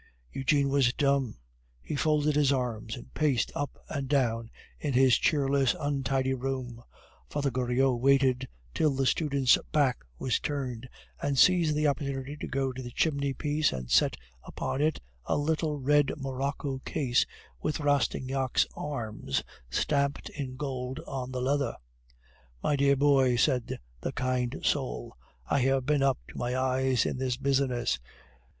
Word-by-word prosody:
Eugene 140 Hz, +1 st, +2 dB
was 135 Hz, -3 st, +3 dB
dumb. 140 Hz, -, +1 dB, 0.4 s
He -, -, -5 dB
folded 150 Hz, +1 st, +2 dB
his 145 Hz, -2 st, +4 dB
arms 125 Hz, -5 st, -2 dB
and 60 Hz, +2 st, -12 dB
paced 140 Hz, -7 st, +1 dB
up 145 Hz, -, -4 dB
and 140 Hz, -3 st, -3 dB
down 115 Hz, -5 st, +1 dB, 0.3 s
in 145 Hz, -3 st, -2 dB
his 130 Hz, -1 st, +5 dB
cheerless, 140 Hz, -5 st, +2 dB
untidy 135 Hz, -2 st, 0 dB
room. 130 Hz, -2 st, -4 dB, 0.5 s
Father 140 Hz, -2 st, -1 dB
Goriot 125 Hz, 0 st, +1 dB
waited 130 Hz, -1 st, +3 dB, 0.3 s
till 150 Hz, -3 st, +2 dB
the 135 Hz, 0 st, +1 dB
student's 140 Hz, -3 st, +3 dB
back 140 Hz, -5 st, +2 dB
was 125 Hz, -, 0 dB
turned, 130 Hz, -4 st, -4 dB, 0.3 s
and 140 Hz, -1 st, 0 dB
seized 170 Hz, 0 st, +5 dB
the 150 Hz, +1 st, +1 dB
opportunity 140 Hz, -1 st, -1 dB
to -, -, -5 dB
go 135 Hz, 0 st, -1 dB
to 130 Hz, -, -6 dB
the 120 Hz, -, -6 dB
chimney 140 Hz, +1 st, 0 dB
piece 150 Hz, 0 st, +1 dB
and 65 Hz, -2 st, -6 dB
set -, -, +4 dB, 0.3 s
upon 135 Hz, -, -3 dB
it 155 Hz, 0 st, +1 dB, 0.3 s
a -, -, +1 dB
little 155 Hz, 0 st, 0 dB
red 145 Hz, +1 st, +3 dB
morocco 135 Hz, 0 st, -3 dB
case 130 Hz, -3 st, +1 dB, 0.4 s
with 150 Hz, -, -1 dB
Rastignac's 135 Hz, -2 st, +1 dB
arms 110 Hz, -, -3 dB, 0.3 s
stamped 140 Hz, -, 0 dB
in 130 Hz, -3 st, -6 dB
gold 130 Hz, -2 st, -4 dB
on 130 Hz, -2 st, -5 dB
the 130 Hz, -1 st, -3 dB
leather. 140 Hz, +1 st, 0 dB, 0.9 s
"My 150 Hz, -, +2 dB
dear 140 Hz, 0 st, +4 dB
boy," 135 Hz, -3 st, +4 dB
said 125 Hz, -1 st, +1 dB, 0.2 s
the -, -, -4 dB
kind 130 Hz, 0 st, -1 dB
soul, 130 Hz, -, -1 dB, 0.3 s
"I 140 Hz, -, +1 dB
have 135 Hz, 0 st, +2 dB
been 145 Hz, 0 st, +2 dB
up 135 Hz, -2 st, +3 dB
to -, -, -8 dB
the 120 Hz, +1 st, -1 dB
eyes 130 Hz, -1 st, +1 dB
in 130 Hz, -, -2 dB
this 130 Hz, -2 st, -1 dB
business. 130 Hz, -, +1 dB
135 Hz, 150 wpm, -29 LUFS, 125-145 Hz, 0.9 s, his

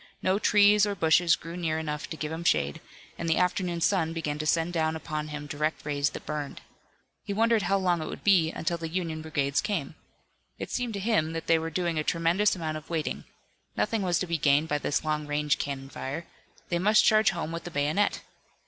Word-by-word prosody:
No 190 Hz, +2 st, +2 dB
trees 210 Hz, 0 st, +5 dB
or 200 Hz, -, -2 dB
bushes 165 Hz, -1 st, +4 dB
grew 165 Hz, +1 st, -9 dB
near 165 Hz, -3 st, -1 dB
enough 150 Hz, -1 st, -4 dB
to 160 Hz, -, -6 dB
give 155 Hz, 0 st, -4 dB
him 165 Hz, +1 st, -4 dB
shade, 70 Hz, -, +1 dB, 0.4 s
and 165 Hz, -, -2 dB
the 160 Hz, -, +3 dB
afternoon 180 Hz, -1 st, 0 dB
sun 165 Hz, -3 st, +2 dB
began 150 Hz, -3 st, -3 dB
to 155 Hz, -, -2 dB
send 165 Hz, +2 st, +1 dB
down 160 Hz, -1 st, 0 dB
upon 155 Hz, -1 st, -4 dB
him 150 Hz, -1 st, -6 dB
direct 150 Hz, +2 st, -2 dB
rays 145 Hz, -1 st, 0 dB
that -, -, -9 dB
burned. 150 Hz, -2 st, -4 dB, 0.6 s
He 200 Hz, -, -4 dB
wondered 225 Hz, +1 st, +3 dB
how 195 Hz, +1 st, +1 dB
long 180 Hz, -3 st, +1 dB
it 155 Hz, -, -4 dB
would -, -, -7 dB
be 175 Hz, -6 st, +4 dB
until 170 Hz, +1 st, -2 dB
the 165 Hz, -1 st, -4 dB
Union 165 Hz, -2 st, -3 dB
brigades 145 Hz, -3 st, 0 dB
came. 175 Hz, -9 st, -2 dB, 0.6 s
It -, -, -6 dB
seemed 245 Hz, -3 st, -2 dB
to -, -, -3 dB
him 190 Hz, -7 st, +1 dB
that 165 Hz, -, -4 dB
they 165 Hz, -1 st, +4 dB
were 165 Hz, 0 st, -3 dB
doing 170 Hz, -1 st, -1 dB
a -, -, 0 dB
tremendous 170 Hz, +7 st, +2 dB
amount 160 Hz, -3 st, -3 dB
of 155 Hz, -, -12 dB
waiting. 165 Hz, -3 st, -3 dB, 0.5 s
Nothing 225 Hz, -2 st, 0 dB
was 180 Hz, -3 st, +1 dB
to -, -, -1 dB
be 170 Hz, -2 st, -2 dB
gained 145 Hz, +2 st, +3 dB
by 150 Hz, -1 st, 0 dB
this 145 Hz, -, -1 dB
long 150 Hz, -1 st, -1 dB
range 150 Hz, 0 st, 0 dB
cannon 135 Hz, -1 st, -4 dB
fire. 140 Hz, +5 st, -5 dB, 0.4 s
They 175 Hz, -, 0 dB
must 210 Hz, +4 st, +4 dB
charge 215 Hz, 0 st, +5 dB
home 170 Hz, -4 st, -3 dB
with 170 Hz, 0 st, -6 dB
the -, -, -4 dB
bayonet. 155 Hz, +6 st, 0 dB
165 Hz, 220 wpm, -28 LUFS, 155-180 Hz, 0.6 s, trees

